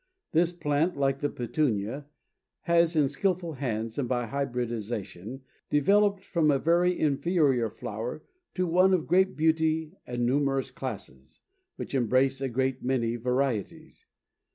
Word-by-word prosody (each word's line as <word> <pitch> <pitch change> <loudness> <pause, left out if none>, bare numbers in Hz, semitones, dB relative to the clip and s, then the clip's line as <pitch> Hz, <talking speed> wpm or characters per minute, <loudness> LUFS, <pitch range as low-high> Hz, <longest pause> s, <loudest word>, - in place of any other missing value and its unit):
This 170 +2 +3
plant, 160 0 0
like 135 -1 +1
the 145 - 0
Petunia, 125 0 -2 0.5
has 170 -1 +3
in 150 -3 +4
skillful 175 +3 -1
hands 115 -3 -3
and 125 -4 -2
by 120 -1 0
hybridization, 120 -3 -4 0.3
developed 200 +6 +3
from 165 -5 +1
a 140 - +4
very 175 +4 +2
inferior 145 -5 +2
flower 115 +8 -6 0.3
to 185 - +1
one 185 +2 +4
of 165 - -2
great 190 +2 +2
beauty 160 0 +1
and 120 -1 -1
numerous 135 0 +1
classes, 100 - -8 0.4
which - - -7
embrace 130 +2 +2
a 135 - -1
great 130 +1 -1
many 120 -3 0
varieties. 125 -2 -2
140 Hz, 130 wpm, -28 LUFS, 120-160 Hz, 0.5 s, in